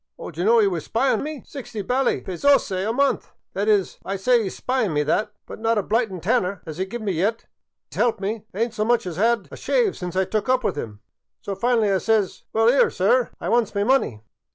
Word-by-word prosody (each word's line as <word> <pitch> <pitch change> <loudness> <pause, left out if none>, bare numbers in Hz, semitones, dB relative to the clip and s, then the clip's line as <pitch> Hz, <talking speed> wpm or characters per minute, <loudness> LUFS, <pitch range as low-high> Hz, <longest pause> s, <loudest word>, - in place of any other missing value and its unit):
Only - - -7
d' 160 - -20
ye - - 0
know 230 +2 +5
what 225 - +5
'e - - -1
's - - -13
pying 260 +4 +1
me? 300 -1 -6
Sixty 230 -7 -7
bally 255 +5 +1
paysoze 245 +7 +2 0.2
a - - +2
month! 275 +4 +1 0.2
That 200 +2 -1
is, 205 -3 +1
I 195 - -3
sye 240 +6 +3
'e 210 -4 -2
's - - -11
pying 250 -9 0
me 150 - +2
that, 210 +8 0
but - - -9
not 225 0 +1
a 205 - +1
blightin' 220 -4 0
tanner 180 +2 0
'as 160 0 -7
'e 190 - 0
give 220 +4 -6
me 205 - 0
yet, 200 +7 0
an' - - -36 0.4
s' - - -11
elp 230 -3 +2
me, 205 +2 -3
I - - -11
ayn't 230 -1 0
so 215 -2 -1
much 235 0 +2
as 175 -1 -5
'ad 230 0 +2
a - - -7
shave 480 -5 +1
since 180 -1 -6
I 190 0 +2
took 215 +3 -2
up 255 -1 +2
with - - 0
'im. 110 -7 -6 0.4
So 200 - -5
finally 225 +1 +1
I 190 - +2
says, 220 -3 0
* - - -59
Well, 225 +1 +2
'ere, 255 +4 +5
sir, 225 +6 +2
I - - -5
wants 235 -3 +1
me 200 - +1
money. 210 - +1
215 Hz, 260 wpm, -23 LUFS, 190-240 Hz, 0.4 s, know